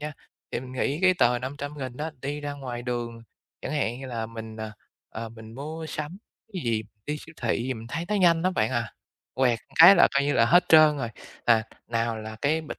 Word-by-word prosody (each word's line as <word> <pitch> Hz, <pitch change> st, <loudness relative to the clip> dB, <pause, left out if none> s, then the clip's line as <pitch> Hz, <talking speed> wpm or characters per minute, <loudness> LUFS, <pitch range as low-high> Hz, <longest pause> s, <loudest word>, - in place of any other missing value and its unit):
nha, 150 Hz, +1 st, -4 dB, 0.4 s
thì -, -, -2 dB
mình 130 Hz, 0 st, -9 dB
nghĩ 135 Hz, +3 st, -1 dB
cái 185 Hz, -1 st, +6 dB
tờ 120 Hz, -4 st, +3 dB
500.000 135 Hz, 0 st, -6 dB
á, 155 Hz, +3 st, -3 dB
đi 145 Hz, +2 st, -3 dB
ra 145 Hz, 0 st, -4 dB
ngoài 125 Hz, -4 st, -6 dB
đường 120 Hz, -2 st, -4 dB, 0.4 s
chẳng -, -, -4 dB
hạn 125 Hz, -5 st, -1 dB
như 135 Hz, -, -6 dB
là 115 Hz, -3 st, -3 dB
mình, 110 Hz, -1 st, -8 dB
ờ, 110 Hz, -1 st, -6 dB, 0.4 s
ờ, 115 Hz, +1 st, -6 dB
mình 110 Hz, 0 st, -12 dB
mua 155 Hz, +4 st, -6 dB
sắm 155 Hz, +5 st, -5 dB, 0.3 s
cái 185 Hz, -4 st, -4 dB
gì, 115 Hz, -2 st, +1 dB, 0.2 s
đi 150 Hz, -, -2 dB
siêu 165 Hz, -, -12 dB
thị 120 Hz, 0 st, +1 dB
gì 130 Hz, +1 st, -2 dB
mình 115 Hz, -1 st, -9 dB
thấy 165 Hz, +8 st, -3 dB
nó 210 Hz, -, 0 dB
nhanh 170 Hz, -4 st, +4 dB
lắm 185 Hz, +1 st, +2 dB
bạn 110 Hz, -6 st, +1 dB
à. 120 Hz, -3 st, -2 dB, 0.4 s
Quẹt 125 Hz, -3 st, +2 dB, 0.2 s
cái 180 Hz, +4 st, +11 dB
là -, -, +7 dB
coi 140 Hz, -, +4 dB
như 145 Hz, -, +1 dB
là 115 Hz, -, +4 dB
hết 175 Hz, +6 st, +5 dB
trơn 155 Hz, -2 st, +7 dB
rồi, 120 Hz, -4 st, -3 dB, 0.4 s
à, 115 Hz, -2 st, +5 dB, 0.2 s
nào 115 Hz, -1 st, -1 dB
là 110 Hz, 0 st, -7 dB
cái 155 Hz, +3 st, +2 dB
bịch 155 Hz, -, -8 dB
130 Hz, 230 wpm, -26 LUFS, 115-150 Hz, 0.4 s, cái